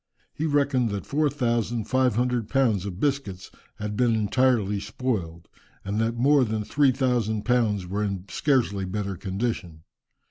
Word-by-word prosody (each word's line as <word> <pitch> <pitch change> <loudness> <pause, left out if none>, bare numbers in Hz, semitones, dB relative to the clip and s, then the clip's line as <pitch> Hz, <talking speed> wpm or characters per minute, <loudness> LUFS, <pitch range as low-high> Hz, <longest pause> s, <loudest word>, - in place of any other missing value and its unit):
He 160 - -2
reckoned 140 -5 +2
that 100 -1 -4
four 150 +1 +1
thousand 120 -4 -1
five 130 -1 +1
hundred 120 -2 0
pounds 115 -8 +1
of 95 -2 -6
biscuits 135 -10 -2 0.2
had 105 0 -5
been 120 0 +2
entirely 110 -2 +2
spoiled, 100 -6 -3 0.4
and 100 +2 -1
that 115 +1 0
more 140 +3 +4
than 110 -2 -2
three 140 +4 +3
thousand 120 -5 0
pounds 115 -6 +1
were 100 +4 -2
in 100 -3 -3
scarcely 120 -10 +1
better 100 +1 -3
condition. 95 -4 -4
115 Hz, 150 wpm, -25 LUFS, 100-130 Hz, 0.4 s, more